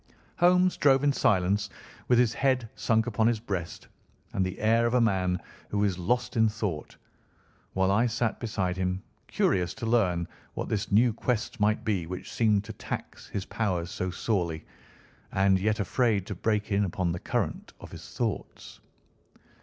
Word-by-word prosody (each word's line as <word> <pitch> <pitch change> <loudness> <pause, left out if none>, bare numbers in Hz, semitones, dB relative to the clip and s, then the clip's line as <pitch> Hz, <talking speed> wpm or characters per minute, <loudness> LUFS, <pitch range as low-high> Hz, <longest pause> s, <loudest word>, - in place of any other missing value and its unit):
Holmes 180 +1 +4
drove 135 -1 +4
in 145 -1 +3
silence, 100 -1 +2 0.4
with 125 - +4
his 120 -1 +3
head 130 -3 +1
sunk 110 -1 +1
upon 110 -2 +1
his 115 -2 +1
breast, 95 -7 -5 0.5
and 95 - +1
the 95 0 -3
air 115 +2 +3
of 120 - 0
a - - +5
man 95 -5 +1 0.3
who 105 0 0
is 95 -3 0
lost 120 +5 0
in 110 -1 +4
thought, 105 -8 -4 0.8
while 95 0 +2
I 115 +5 +3
sat 115 -1 -1
beside 95 -6 -1
him, 95 0 -1 0.2
curious 90 -2 +1
to - - -5
learn 95 -7 +2 0.3
what - - -3
this 105 -1 -2
new 115 +3 +4
quest 115 0 -2
might 105 +2 +1
be 95 -7 0
which 90 +1 -6
seemed 105 -3 +2
to 110 +1 -8
tax - - -6
his 100 - -4
powers 90 -6 -2
so 95 - -2
sorely, 85 -5 -2 0.7
and 95 0 +3
yet 105 +2 0
afraid 105 -1 +1
to 100 - -4
break 105 +2 -1
in 100 +1 +3
upon 90 -2 -1
the 85 - -3
current - - -2
of - - -11
his - - -10
thoughts. 110 -8 -4
105 Hz, 170 wpm, -28 LUFS, 95-115 Hz, 0.8 s, a